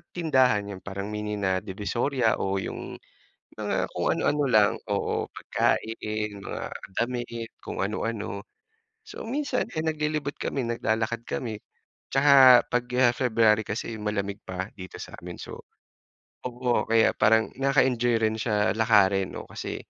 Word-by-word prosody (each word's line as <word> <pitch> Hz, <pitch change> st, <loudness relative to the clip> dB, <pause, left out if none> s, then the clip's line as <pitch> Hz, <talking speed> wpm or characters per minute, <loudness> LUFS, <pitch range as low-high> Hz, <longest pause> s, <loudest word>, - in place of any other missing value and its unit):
tindahan, 130 Hz, -, +3 dB
'yun 95 Hz, -, -7 dB
parang 100 Hz, +2 st, -6 dB
mini 105 Hz, 0 st, -3 dB
na 95 Hz, -2 st, 0 dB
Divisoria 110 Hz, +5 st, -1 dB
o 95 Hz, 0 st, -1 dB
'yung 95 Hz, -, -5 dB, 0.6 s
mga -, -, -1 dB
kung -, -, -2 dB
ano-ano 145 Hz, 0 st, +1 dB
lang, 110 Hz, -4 st, +5 dB, 0.2 s
oo, 100 Hz, -1 st, -1 dB
pagkain, 110 Hz, -2 st, -1 dB
mga 100 Hz, -, -6 dB, 0.2 s
damit 120 Hz, -1 st, -3 dB
kung -, -, -4 dB
ano-ano. 105 Hz, 0 st, -3 dB, 0.6 s
So 425 Hz, -, -8 dB
minsan 280 Hz, +5 st, -1 dB
eh, 155 Hz, -, -1 dB
naglilibot 150 Hz, -2 st, -2 dB
kami 135 Hz, -3 st, -2 dB
naglalakad 115 Hz, 0 st, -1 dB
kami, 110 Hz, -4 st, -4 dB, 0.6 s
tsaka 135 Hz, -2 st, +8 dB
pag 125 Hz, 0 st, 0 dB, 0.2 s
ah, 120 Hz, -2 st, +5 dB
February 115 Hz, -4 st, +3 dB
kasi 110 Hz, +1 st, -4 dB
malamig 100 Hz, -2 st, -2 dB
pa 95 Hz, +2 st, -4 dB
dito 95 Hz, -1 st, -9 dB
sa'min 90 Hz, 0 st, -9 dB
so -, -, -8 dB, 0.9 s
oo, 125 Hz, -2 st, -1 dB
kaya 115 Hz, 0 st, +4 dB
parang 110 Hz, 0 st, +4 dB
nakaka-enjoy 130 Hz, -3 st, +3 dB
rin 110 Hz, 0 st, +1 dB
siya 105 Hz, -3 st, +1 dB
lakarin 100 Hz, -4 st, +3 dB
'no, -, -, -6 dB
kasi -, -, -5 dB
110 Hz, 135 wpm, -26 LUFS, 105-125 Hz, 0.9 s, tsaka